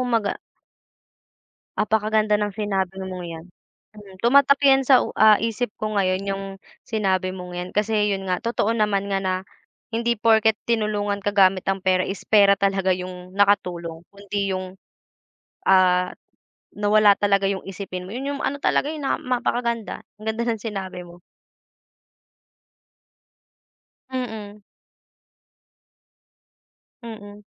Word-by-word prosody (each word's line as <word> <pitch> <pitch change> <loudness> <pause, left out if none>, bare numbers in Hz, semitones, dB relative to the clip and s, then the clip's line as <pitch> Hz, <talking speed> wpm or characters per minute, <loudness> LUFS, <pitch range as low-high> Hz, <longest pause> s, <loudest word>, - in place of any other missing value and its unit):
mag 230 -3 +1
ah - - -14 1.4
Apakaganda 215 0 +1
ng 205 -1 -2
sinabi 190 -3 -2
mong 185 -1 -6
yan, 165 -1 -8 0.5
hmm. 195 -2 -13
Tumatak 280 +3 +5
yan 270 -1 +5
sa 260 -1 +6
u - - -4
ah, 215 -1 +7
isip 230 0 -2
ko 215 0 -4
ngayon 185 0 +1
yung 195 0 -2 0.4
sinabi 190 -4 0
mong 180 -1 -8
yan 180 +1 -4
kasi 210 -1 +1
yun 195 -1 -5
nga. 180 - +1
Totoo 230 -2 -1
naman 205 -3 0
nga 195 - +1
na 185 -1 -1 0.6
hindi 235 +1 0
porket 220 -1 +4 0.2
tinulungan 210 -2 0
ka 205 - 0
gamit 190 -2 +4
ang 195 - -1
pera 185 -1 +2
is 195 - -5
pera 200 -2 +6
talaga 195 -1 +1
yung 180 0 -8
nakatulong 175 -5 0
kundi 200 -1 -3
yung, 185 0 -5 1.0
ah, 180 -1 +4 0.6
nawala 210 0 +5
talaga 200 -1 +2
yung 195 -1 -3
isipin 190 -1 -6
mo, 185 - -10
yun 270 +3 -4
yung - - -7
ano 285 +1 -2
talaga, 295 - +1
eh, 310 - -7
na 270 - 0
mapakaganda, 235 -2 -2 0.2
ang - - -10
ganda 230 +2 -2
ng 225 -2 -1
sinabi 195 -5 -5
mo. 175 0 -16 2.9
Mm. 215 -5 -6 2.4
Mm. 210 -2 -10
205 Hz, 135 wpm, -23 LUFS, 190-220 Hz, 2.9 s, ah